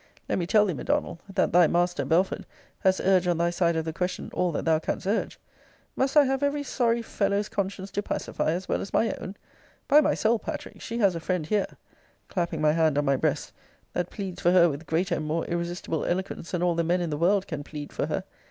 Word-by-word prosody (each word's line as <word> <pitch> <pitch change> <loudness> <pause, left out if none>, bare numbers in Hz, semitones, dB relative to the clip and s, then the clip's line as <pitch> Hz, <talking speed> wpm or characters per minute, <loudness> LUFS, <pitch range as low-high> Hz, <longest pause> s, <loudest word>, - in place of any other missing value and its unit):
Let - - 0
me 170 - -2
tell 210 +2 +5
thee, 190 - -1
M'Donald, 160 +3 -1
that 195 0 +1
thy 175 -1 +7
master, 175 +1 +1
Belford, 180 +4 +1 0.3
has 190 0 +2
urged 185 -1 +3
on 175 -2 +2
thy 170 +1 +1
side 170 -1 +1
of 160 -1 -1
the 160 - -3
question 180 +2 -3
all 180 -1 +1
that - - -2
thou 160 -1 +3
canst 160 - -3
urge. 205 +4 -1 0.6
Must 270 +3 +1
I 295 - +9
have 270 +1 0
every 285 0 0
sorry 235 -3 +1
fellow's 205 -1 0
conscience 195 0 -3
to 205 - -1
pacify, 200 - -2
as 180 +3 -2
well - - 0
as 195 - -6
my 225 - +3
own? 190 - -7 0.5
By 295 +1 +7
my - - +2
soul, 225 +1 +2
Patrick, - - -7
she 230 - -4
has 200 -5 +3
a - - -2
friend 175 -1 -1
here, 205 +3 +1 0.6
[clapping 175 -3 -2
my 155 0 +4
hand 160 -2 +2
on 145 - +2
my 140 -1 +3
breast,] - - -1 0.4
that 180 -1 -1
pleads 195 -3 -6
for 175 - +4
her 180 -1 +6
with 150 +2 -6
greater 170 +4 0
and 155 - -3
more 160 +2 -1
irresistible 170 -2 -3
eloquence 185 -1 -3
than 180 -1 -1
all 175 -1 +3
the 170 0 0
men 175 +2 +1
in 170 -2 -2
the - - 0
world 190 +4 +2
can 150 -3 -5
plead 145 0 -8
for - - -1
her. - - -2
180 Hz, 235 wpm, -27 LUFS, 165-200 Hz, 0.6 s, I